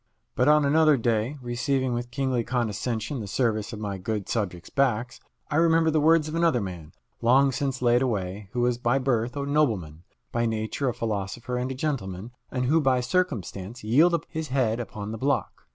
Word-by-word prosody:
But 125 - +2
on 150 -1 +5
another 155 0 +4
day, 115 +3 0
receiving 125 +1 0
with 120 0 -3
kingly 130 -2 -1
condescension 115 +1 -2
the 105 - -5
service 110 -1 0
of 110 - -6
my 100 -2 -4
good 105 +1 -3
subjects' 90 -6 -3
backs, 120 -3 0 0.3
I 145 - +1
remembered 165 -1 +4
the 155 - +3
words 160 0 +4
of 155 - -6
another 165 -6 +2
man, 90 -7 -7 0.3
long 135 +4 +4
since 135 -1 -2
laid 120 0 +4
away, 100 -5 -2
who 120 - 0
was 120 0 +1
by 120 +2 +2
birth 125 -1 0
a 140 - -2
nobleman, 110 - 0 0.3
by 120 0 0
nature 110 +5 -1
a - - -2
philosopher 110 +3 -3
and 125 +1 -1
a - - -4
gentleman, 115 -8 -3 0.2
and 125 -1 -2
who 155 +5 +3
by 130 -3 +3
circumstance 120 - -2
yielded 150 +11 +4
up 165 - -3
his 160 -1 -4
head 125 -4 +1
upon 105 -3 -6
the 110 - -6
block. 140 +2 -1
125 Hz, 190 wpm, -26 LUFS, 110-140 Hz, 0.3 s, on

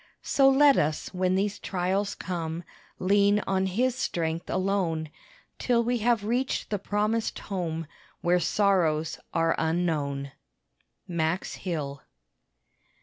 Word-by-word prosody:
So 270 -1 +4
let 280 +1 +6
us 155 +5 -1
when 185 0 +1
these 200 +1 0
trials 195 +2 -1
come, 170 -2 -4 0.3
Lean 200 +2 +3
on 190 0 +1
his 240 +7 +1
strength 165 -9 -2
alone, 185 -5 0 0.5
Till 235 -2 +2
we 240 +1 0
have 230 -1 +2
reached 245 +3 -1
the 205 - 0
promised 210 +3 -1
home 165 -4 -3 0.4
Where 175 +1 +3
sorrows 170 -5 +1
are 165 0 +2
unknown. 155 -5 -1 0.8
MAX 170 +1 -1
HILL. 145 -7 -4
185 Hz, 115 wpm, -27 LUFS, 165-210 Hz, 0.8 s, let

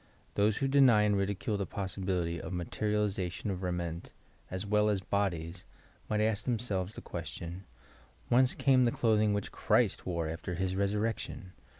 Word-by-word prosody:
Those 105 +1 +2
who 135 - +1
deny 135 -6 +6
and 105 -1 +3
ridicule 100 +2 -1
the 100 - -2
possibility 90 -3 -2
of - - -6
materialization 100 +1 -1
of 95 -1 -4
raiment 85 -2 -3 0.4
(as 95 +2 -3
well 105 +1 +3
as 105 -2 +1
bodies) 90 -3 -2 0.5
might 105 0 +1
ask 110 -1 +1
themselves 105 -5 -1
the - - -7
question, 85 +3 -6 0.6
"'Whenee 125 +1 +4
came 130 -2 +4
the 120 - +3
clothing 110 -3 +3
which 100 -1 -2
Christ - - +1
wore 85 -3 -1
after 80 +2 -4
his 95 +1 -1
resurrection!" 100 -1 -2
100 Hz, 155 wpm, -31 LUFS, 90-105 Hz, 0.6 s, deny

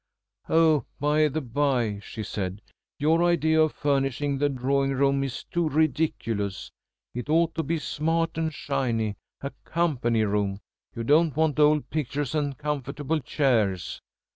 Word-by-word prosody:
"Oh, 160 -3 +4
by 150 +2 +3
the 155 +2 -2
bye," 125 -5 0
she 110 +2 -7
said. 100 -1 -4 0.3
"Your 160 +3 +3
idea 160 -2 +3
of 155 -1 +2
furnishing 140 0 0
the 145 0 +2
drawing 135 +1 0
room 140 0 +2
is 135 -2 -4
too 170 -2 -1
ridiculous. 130 - -1 0.4
It 125 +4 -5
ought 165 +1 +3
to 165 - -1
be 165 +2 -1
smart 165 +2 -1
and 160 0 -1
shiny 120 -8 -1 0.2
a 140 - -4
company 130 -10 +1
room. 100 -1 0 0.4
You 115 - -3
don't 150 +4 +3
want 155 -2 +1
old 150 0 +4
pictures 145 -2 -2
and 145 -3 -1
comfortable 150 +1 -2
chairs!" 115 - 0
145 Hz, 140 wpm, -26 LUFS, 125-155 Hz, 0.4 s, Oh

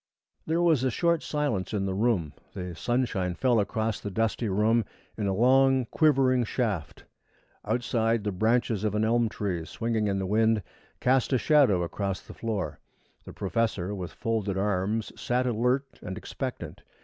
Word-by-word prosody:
There 165 +2 +1
was 160 -7 +3
a 130 - +2
short 170 +5 +1
silence 130 -10 -2
in 95 -1 0
the 95 - -1
room. 95 -8 0 0.2
The 90 -1 -5
sunshine 100 -3 -1
fell 125 0 +2
across 110 +1 -1
the 100 - -5
dusty 115 +2 -1
room 110 +4 +2 0.3
in 105 -2 -2
a 95 - 0
long, 130 +3 +4
quivering 135 -5 +3
shaft. 110 - -2 0.6
Outside, 115 -2 0
the 105 - -1
branches 110 +1 +1
of 105 -1 0
an 105 +1 +2
elm 115 0 +2
tree 95 -6 -3
swinging 110 +4 -1
in 100 -1 0
the 95 - -2
wind 110 +1 +2 0.4
cast 130 +1 +2
a - - +5
shadow 125 - +4
across 95 +2 -3
the - - -12
floor. 100 - -3 0.5
The - - -9
professor, 105 -2 -1
with 90 -4 -5
folded 105 -4 -2
arms, 105 +2 -1
sat 125 -1 0
alert 125 +3 0
and 95 0 -6
expectant. - - -6
110 Hz, 160 wpm, -27 LUFS, 100-125 Hz, 0.6 s, a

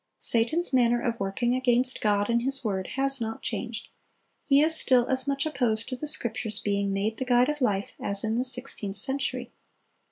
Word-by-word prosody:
Satan's 265 +9 0
manner 240 -2 +3
of 235 -1 -3
working 200 +5 -1
against 255 0 +1
God 205 -1 +1
and 235 0 +1
His 270 +2 +4
word 190 -3 -2
has 270 -1 +1
not 225 0 -5
changed; 225 -2 -5 0.5
he 275 -1 +4
is 320 +1 +5
still 255 -5 +3
as 260 +1 +3
much 275 +1 0
opposed 235 -7 0
to 255 - -4
the 300 +4 -6
Scriptures 220 -6 -2
being 200 -1 -1
made 205 +3 -2
the - - -2
guide 245 +1 +3
of 295 -1 -4
life 205 -5 -1
as 200 0 0
in 220 0 -1
the 240 +2 0
sixteenth 250 -6 -2
century. 270 +6 -2
240 Hz, 190 wpm, -26 LUFS, 220-265 Hz, 0.5 s, is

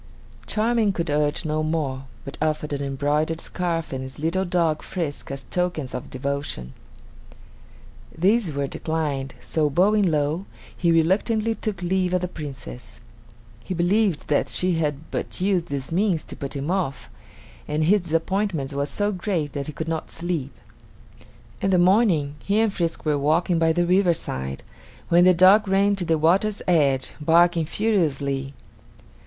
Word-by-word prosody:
Charming 220 -1 +1
could 170 -3 -2
urge 150 +2 0
no 155 0 0
more, 150 -4 -2 0.2
but 140 - -6
offered 155 -1 -1
an 140 - -2
embroidered 145 +4 0
scarf 165 -4 -3
and 130 - -3
his 130 0 -8
little 165 +5 0
dog 170 -3 +1
Frisk 165 -6 -4
as 140 0 -5
tokens 175 -7 -2
of 125 - -5
devotion. 135 - -4 1.4
These 195 +2 +2
were 140 -1 -1
declined, 145 -3 -3
so 155 -2 0
bowing 195 +5 +3
low, 155 +4 0 0.3
he 170 -2 +2
reluctantly 210 +7 +2
took 210 -5 -4
leave 185 0 +1
of 180 - +1
the 180 - -1
Princess. 135 -7 -9 0.6
He 185 - -4
believed 180 0 +1
that 145 - +1
she 180 0 +1
had 155 -3 0 0.2
but - - -4
used 185 -2 +1
this 140 0 -4
means 180 -2 +1
to - - -9
put 140 0 -6
him 140 +4 -2
off, 180 -8 -2 0.6
and 155 +1 0
his 200 +6 +4
disappointment 165 -3 -1
was 140 +1 -1
so 205 0 0
great 180 -6 -2
that 140 0 -4
he 155 - -5
could 160 +3 -5
not 160 -1 -3
sleep. 165 -5 -3 1.1
In 195 - +1
the 185 - +4
morning 175 -6 +3
he 205 +2 +1
and 220 -2 +2
Frisk 170 -3 -2
were 150 -2 +1
walking 165 +4 +2
by 165 0 +3
the 175 +2 +1
riverside 170 - 0 0.5
when 175 +1 +6
the 185 - +7
dog 195 +4 +6
ran 200 +1 +3
to 180 - -3
the 165 -1 +2
water's 190 +7 +2
edge, 140 -7 +2
barking 165 +1 +4
furiously. 140 -10 0
165 Hz, 160 wpm, -24 LUFS, 145-185 Hz, 1.4 s, the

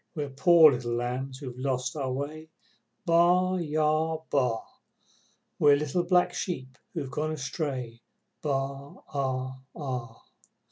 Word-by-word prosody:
We're 145 -3 -3
poor 160 +2 +7
little 120 -2 -2
lambs 125 +2 -3
who've 130 -3 -8
lost 130 -1 -1
our 135 -3 -2
way, 150 +4 -5 0.6
Baa! 180 +2 +4
Baa! 155 0 +1
Baa! 125 -5 +2 1.0
We're 145 -1 +7
little 150 +4 0
black 180 0 +3
sheep 130 -8 -4 0.2
who've 140 -5 -3
gone 155 +4 -1
astray, 135 -5 -4 0.4
Baa 140 -1 -2 0.2
aa 130 -1 -2 0.2
aa! 125 -6 -5
140 Hz, 120 wpm, -28 LUFS, 130-155 Hz, 1.0 s, poor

